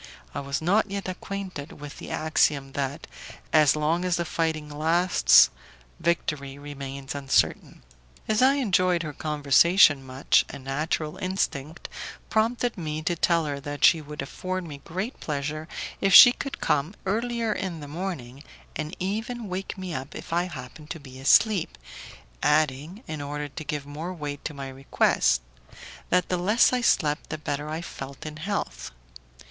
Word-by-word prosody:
I - - -3
was 140 +2 -3
not 205 +5 +3
yet 200 -1 -4
acquainted 185 -4 -6
with 145 -1 -10
the - - -8
axiom 150 -3 +1
that 140 +3 -3 0.5
"as 155 -3 +6
long 155 +3 +1
as 180 -1 +1
the 170 - -1
fighting 160 -2 -1
lasts, 155 - +5 0.5
victory 145 -5 -1
remains 140 -1 -7
uncertain." 140 -2 0 0.4
As 215 +1 +2
I 265 +2 +6
enjoyed 185 -9 +2
her 150 -2 -5
conversation 150 +1 +4
much, 130 +1 +2
a - - -7
natural 150 +3 -2
instinct 165 -5 -3 0.4
prompted 230 0 +1
me 155 -1 -4
to 175 - 0
tell 170 0 +2
her 145 -1 -3
that 145 +1 0
she 165 -1 +6
would 150 -1 -6
afford 185 +6 -4
me 145 -4 -9
great 190 +9 -4
pleasure 150 +1 -3 0.3
if 195 -1 +4
she 245 - +12
could 275 +2 -6
come 150 +7 0
earlier 230 +2 0
in 185 -5 -4
the 145 - -8
morning, 145 -5 -6 0.3
and 155 +1 -4
even 220 +4 -3
wake 190 +2 -4
me 185 -2 -5
up 135 0 -6
if - - -7
I 175 +1 +2
happened 150 -2 -9
to 165 - -5
be 130 -2 -12
asleep, 185 +7 +3 0.6
adding, 155 - +1
in 155 -2 -5
order 145 +1 -4
to 145 +3 -8
give 150 -2 -4
more 160 +6 -6
weight 145 -3 -6
to 150 - -4
my 135 -1 -6
request, 130 - +1 0.7
that 180 -1 +2
the 180 - +1
less 210 +8 +4
I 250 - +1
slept 150 -9 +1
the 155 - -3
better 150 0 -4
I 160 +2 -3
felt 135 -3 -8
in 155 0 -6
health. 155 - -4
155 Hz, 160 wpm, -26 LUFS, 145-185 Hz, 0.7 s, she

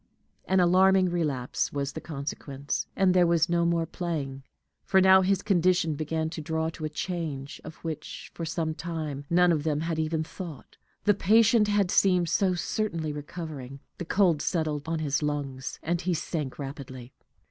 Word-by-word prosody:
An 190 - +2
alarming 185 +1 +5
relapse 145 -8 -1
was 140 -1 -3
the 160 - -6
consequence, 140 -2 -4
and 190 -2 +3
there 180 -1 +5
was 170 0 +3
no 170 0 +2
more 170 -1 +1
playing; 150 -6 -4 0.4
for 190 - +3
now 190 0 +7
his 190 0 +1
condition 180 -4 +2
began 160 +1 -2
to 165 - -5
draw 160 +1 -1
to 160 -1 -6
a - - -2
change, 150 -4 -4
of 155 - -9
which, 155 -2 -6
for 170 - -6
some 160 -1 -2
time, 155 -3 -5
none 180 +1 +5
of 155 -3 +1
them 150 -1 0
had 165 -1 -2
even 160 0 0
thought, 165 -3 -9 0.3
the 205 - +5
patient 220 +3 +4
had 205 -3 +2
seemed 180 -3 +3
so 185 +1 +2
certainly 170 -5 -2
recovering. 145 -3 -7 0.2
The 175 - -4
cold 175 -4 +3
settled 155 -4 -1
on 165 0 -1
his 150 -2 0
lungs, 140 -3 -3
and 170 +2 -1
he 180 -1 0
sank 150 -4 -3
rapidly. 135 -3 -8
165 Hz, 170 wpm, -27 LUFS, 150-180 Hz, 0.4 s, now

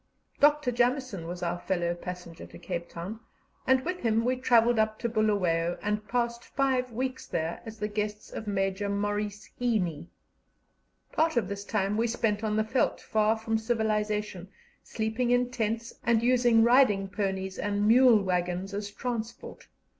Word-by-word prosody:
Dr. 295 -2 +4
Jameson 245 - 0
was 175 +1 -6
our 175 0 -1
fellow 175 -2 -1
passenger 175 -1 -8
to - - -12
Cape 170 -2 -5
Town, 185 +6 -6 0.5
and 260 +1 +3
with 360 +1 -2
him 230 -1 +1
we 255 +1 +2
travelled 240 -2 +3
up 215 0 +1
to 235 - -2
Bulawayo, 185 -6 +1
and 210 0 -2
passed 235 +1 -1
five 260 -2 0
weeks 255 +3 -3
there 165 +1 -3
as 220 0 -8
the 210 0 -2
guests 210 0 -4
of 220 - -6
Major 195 0 -1
Maurice 205 +1 -2
Heaney. 180 -10 0 1.0
Part 320 -3 +1
of 220 -6 +2
this 200 +1 -5
time 205 -1 -1
we 230 +1 +2
spent 225 -2 -1
on 215 -1 0
the 215 - +2
veldt, 235 +4 0
far 215 +1 +1
from 225 0 -1
civilization, 210 -4 -1 0.3
sleeping 225 +2 -2
in 245 0 +2
tents, 230 -1 -2
and 230 -1 +2
using 240 -2 +4
riding 235 -5 +4
ponies 190 -1 -3
and 205 0 0
mule 235 -2 +6
waggons 180 +1 -1
as 205 0 -3
transport. 235 +1 -6
215 Hz, 160 wpm, -28 LUFS, 195-240 Hz, 1.0 s, mule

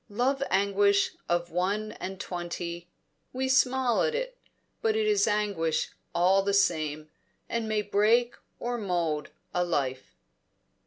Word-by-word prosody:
Love 255 +6 0
anguish 200 +1 +3 0.2
of 175 0 0
one 200 +5 -1
and 190 0 -5
twenty; 175 -1 -5 0.4
we 260 +1 -1
smile 260 -2 +3
at 465 - +1
it, - - -3 0.5
but 445 -2 +2
it 440 0 +1
is 420 - +3
anguish 200 -7 0 0.2
all 185 +3 +4
the 200 0 +1
same, 155 -5 +1 0.4
and 230 -1 -2
may 215 -1 +1
break 220 +4 +3 0.2
or 240 0 -2
mould 170 -7 -1 0.2
a 180 - +2
life. 135 -7 -2
200 Hz, 135 wpm, -28 LUFS, 175-240 Hz, 0.5 s, all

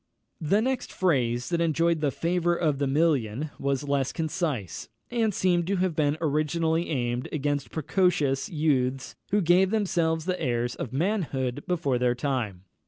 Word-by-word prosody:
The 200 +8 +2
next 260 0 -2
phrase 125 -9 0
that 170 -1 0
enjoyed 165 0 +2
the 150 - +2
favour 175 +4 0
of 155 -5 0
the 140 - +1
million 145 -2 +1
was 140 +1 -1
less 140 -2 0
concise, 155 - -3 0.2
and 230 -3 +1
seems 180 -3 +1
to 200 +3 0
have 185 -3 0
been 150 -1 +1
originally 160 +2 0
aimed 120 -3 -2
against 145 -4 -1
precocious 160 - +1
youths 135 -6 0
who 205 +1 +2
gave 180 +2 +4
themselves 170 -7 0
the 185 -1 -2
airs 120 -1 0
of 120 - -6
manhood 145 - -1
before 150 -8 0
their 125 0 +2
time. 120 -9 -2
155 Hz, 155 wpm, -27 LUFS, 135-175 Hz, 0.2 s, gave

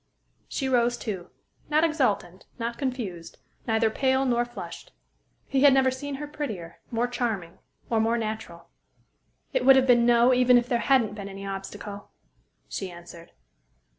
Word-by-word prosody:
She 270 - -2
rose, 240 -2 +2
too 195 -7 -5 0.4
not 305 +1 +3
exultant, 250 - 0
not 235 -1 -4
confused, 235 - -4 0.3
neither 220 -1 +2
pale 265 +2 +1
nor 240 -1 +2
flushed. 240 - -9 0.6
He 270 -1 +1
had 280 -2 +7
never 260 -1 +4
seen 280 +2 -5
her 295 +2 -5
prettier, 215 - -6
more 235 +1 0
charming, 225 -9 -3 0.3
or 225 - +1
more 225 +2 +2
natural. 215 -6 -5 0.8
"It - - +1
would 270 - +8
have 265 -1 +4
been 240 -2 +5
'no,' 240 +1 +5
even 250 0 +5
if 240 0 +1
there 240 -1 +1
hadn't 240 -6 +2
been 200 -1 -7
any 195 0 -8
obstacle," 195 +1 -7 0.6
she 195 - -4
answered. 170 -1 -12
235 Hz, 155 wpm, -26 LUFS, 200-260 Hz, 0.8 s, would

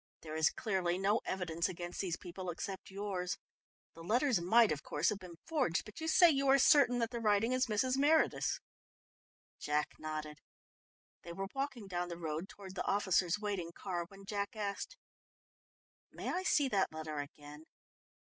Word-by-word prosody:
There 155 -1 -7
is 160 -2 +4
clearly 185 -4 -1
no 200 +4 +2
evidence 170 -3 -1
against 175 0 -5
these 180 -4 -2
people, 180 +1 -7
except 190 +3 -5
yours. 190 -3 -3 0.6
The 165 - -12
letters 235 - +2
might, 225 +5 +5
of 150 -1 -1
course, 150 +2 0
have 205 - -2
been 180 -3 -10
forged, 275 - 0
but 215 +8 -10
you 320 - -2
say 350 +2 +7
you 275 -1 +1
are 270 +1 +7
certain 265 -2 +6
that 230 -1 0
the 240 - -3
writing 215 +1 +2
is 255 0 +2
Mrs. 255 +5 +1
Meredith's." 305 +3 +3 1.0
Jack 150 0 0
nodded. 155 -1 -5 0.8
They 170 - -8
were 195 +2 -4
walking 270 -5 -3
down 175 -2 -2
the 170 - -5
road 165 +3 -4
towards 195 -3 -10
the 190 - -3
officers' 190 -3 +2
waiting 195 -5 -3
car, 175 -3 -3
when 195 +1 -14
Jack 205 0 -3
asked: 210 - -4 1.1
"May - - -5
I 365 - -1
see 295 -6 +3
that 195 -5 +1
letter 155 -1 -5
again?" 145 +1 -9
195 Hz, 170 wpm, -34 LUFS, 170-230 Hz, 1.1 s, say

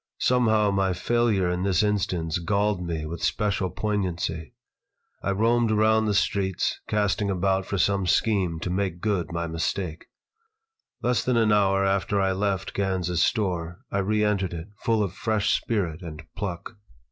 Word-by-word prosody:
Somehow 110 -5 +3
my 95 -1 +1
failure 110 0 +1
in 90 0 -2
this 95 -2 +2
instance 90 -6 0
galled 100 +2 0
me 80 -3 -3
with 85 +2 -6
special 100 -3 0
poignancy. 90 -7 -2 0.7
I - - -2
roamed 115 +4 +2
around 110 +1 +3
the 105 - +1
streets, 95 -2 0
casting 105 -1 0
about 95 0 0
for 100 - -2
some 100 0 +1
scheme 95 -4 +1
to 90 - -2
make 95 -2 -1
good 100 -4 -1
my 85 0 -2
mistake 80 0 -3 1.0
Less 125 0 +1
than 125 -2 +1
an 110 -2 +3
hour 100 -1 +3
after 100 +1 +1
I 95 -1 +2
left 95 0 -1
Gans's 95 -3 0
store 90 -6 -1
I 100 - 0
re 105 +2 +1
entered 100 -4 0
it, 85 +4 -7
full 110 -2 +1
of 95 -3 -3
fresh 110 -3 0
spirit 95 -7 -2
and 80 -3 -8
pluck. 100 +2 -5
100 Hz, 160 wpm, -25 LUFS, 90-105 Hz, 1.0 s, Somehow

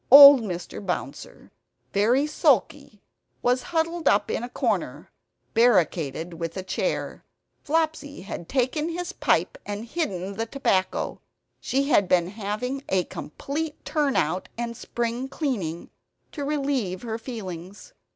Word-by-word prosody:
Old 280 -1 +11
Mr. 180 -1 -5
Bouncer, 185 -2 -5 0.4
very 235 +8 +3
sulky, 300 - +1 0.4
was 250 +1 +3
huddled 330 -1 0
up 200 - +3
in - - -1
a 240 - -5
corner, - - -2 0.4
barricaded 175 - +2
with 165 +1 -5
a 190 - -3
chair. 345 - -2 0.4
Flopsy 315 - -1
had 180 -3 -7
taken 260 +3 0
away 335 - -3
his 355 +1 -4
pipe - - +1
and 205 +2 -5
hidden 200 - -3
the 225 0 -2
tobacco. 195 -8 0 0.4
She 275 +2 0
had 200 -8 +4
been 175 -1 +3
having 215 +6 -3
a 185 -1 +2
complete 295 - -5
turn 295 -3 +1
out 180 +5 0
and 235 0 -3
spring 235 +3 -3
cleaning, 205 - -3 0.4
to 290 - -5
relieve 275 -10 -1
her 225 -1 -3
feelings. 195 -6 -8
235 Hz, 130 wpm, -25 LUFS, 190-285 Hz, 0.4 s, Old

